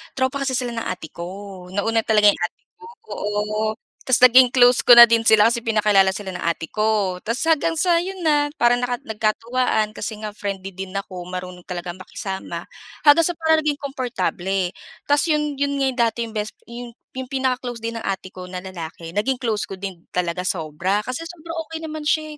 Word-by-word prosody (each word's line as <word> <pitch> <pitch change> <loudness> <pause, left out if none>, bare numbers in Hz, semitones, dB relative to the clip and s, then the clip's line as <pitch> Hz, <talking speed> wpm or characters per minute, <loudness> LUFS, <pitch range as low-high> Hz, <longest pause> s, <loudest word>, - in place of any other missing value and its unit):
tropa 260 +1 0
kasi 260 -1 0
sila 245 -1 -2
ng 230 -1 -4
ate 175 -4 -5
ko. 185 +1 -8
Nauna 225 +3 +1
talaga 210 -2 +6
yung - - -7
ate - - -4 0.2
ko. 450 - -13 0.3
Oo, 215 +1 -2 0.3
tas 260 -2 +3
naging 255 +1 +8
close 245 0 +5
ko 240 - +8
na 235 - +12
din 230 -1 +4
sila 220 +1 +6
kasi 235 - 0
pinakilala 210 -4 +3
sila 195 -2 -5
ng 180 - -6
ate 170 -1 -1
ko 210 -4 0
tas 230 +3 -2
hanggang 325 0 +2
sa 345 0 +3
yun 380 +2 -5
na, 295 -2 +3
parang 240 0 +3
naka 245 0 -1
nagkatuwaan 220 +1 0
kasi 215 +1 -5
nga 210 - -4
friendly 195 -2 -5
din 190 +1 -8
ako. 185 -3 -5
Marunong 180 -1 -7
talagang 175 0 -6
makisama, 190 +1 -6 0.4
hanggang 310 +2 +6
sa 350 - -2
parang 320 -1 +3
naging 300 -2 0
komportable 195 -9 -2 0.3
tas 290 0 +3
yun 300 -1 +1
yun 280 0 0
nga 275 - +1
yung 255 - -9
dati 230 -1 +2
yung 225 - -9
best 210 -1 -4
yung 235 0 -9 0.2
yung 260 - -3
pinaka-close 255 -3 -2
din 230 0 -4
ng 225 - -6
ate 190 -1 -3
ko 185 0 -9
na 180 0 -6
lalaki 170 -3 -8
naging 255 +4 0
close 220 -4 0
ko - - -8
din 190 -3 -7
talaga 180 0 -1
sobra 180 +3 -1
kasi 255 +9 -5
sobra 335 -1 -9
okey 325 +1 -7
naman 310 -1 -6
siya, 310 0 0
220 Hz, 200 wpm, -22 LUFS, 190-260 Hz, 0.4 s, na